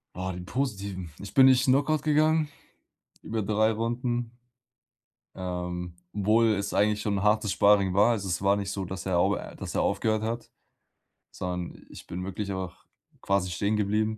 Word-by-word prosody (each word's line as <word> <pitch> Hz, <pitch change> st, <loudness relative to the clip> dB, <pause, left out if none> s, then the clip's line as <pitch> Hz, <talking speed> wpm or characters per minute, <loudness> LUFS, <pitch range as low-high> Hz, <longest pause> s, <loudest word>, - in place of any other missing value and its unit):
Ah, 95 Hz, +1 st, -3 dB
die 90 Hz, -, -6 dB
Positiven. 100 Hz, -, -3 dB
Ich 100 Hz, -, -9 dB
bin 135 Hz, -1 st, +7 dB
nicht 130 Hz, -1 st, +5 dB
Knockout 140 Hz, +3 st, +2 dB
gegangen 155 Hz, +1 st, +3 dB, 0.8 s
über 110 Hz, -1 st, -2 dB
3 110 Hz, +2 st, +2 dB
Runden, 120 Hz, +1 st, -2 dB, 1.0 s
ähm, 90 Hz, -1 st, -4 dB, 0.2 s
obwohl 110 Hz, +3 st, +3 dB
es 100 Hz, 0 st, -2 dB
eigentlich 105 Hz, +1 st, +2 dB
schon 100 Hz, -1 st, -1 dB
hartes 105 Hz, -1 st, +2 dB
Sparring 100 Hz, -2 st, +4 dB
war. 105 Hz, +4 st, +5 dB
Also, 100 Hz, -4 st, -2 dB
es 90 Hz, -2 st, -1 dB
war 100 Hz, +1 st, +4 dB
nicht 100 Hz, -1 st, -3 dB
so, 100 Hz, -2 st, -3 dB
dass 95 Hz, +1 st, -6 dB
er 90 Hz, -2 st, +1 dB
au -, -, +3 dB
äh, -, -, -8 dB
dass -, -, -6 dB
er -, -, +1 dB
aufgehört 110 Hz, -1 st, +1 dB
hat, 115 Hz, +2 st, -4 dB, 0.8 s
sondern 90 Hz, -1 st, -5 dB
ich -, -, -11 dB
bin 90 Hz, +1 st, -5 dB
wirklich 100 Hz, +1 st, -4 dB
auch 95 Hz, -2 st, -6 dB, 0.4 s
quasi 100 Hz, -2 st, +1 dB
stehen 100 Hz, +5 st, 0 dB
geblieben. 110 Hz, +1 st, 0 dB
100 Hz, 170 wpm, -27 LUFS, 95-115 Hz, 1.0 s, bin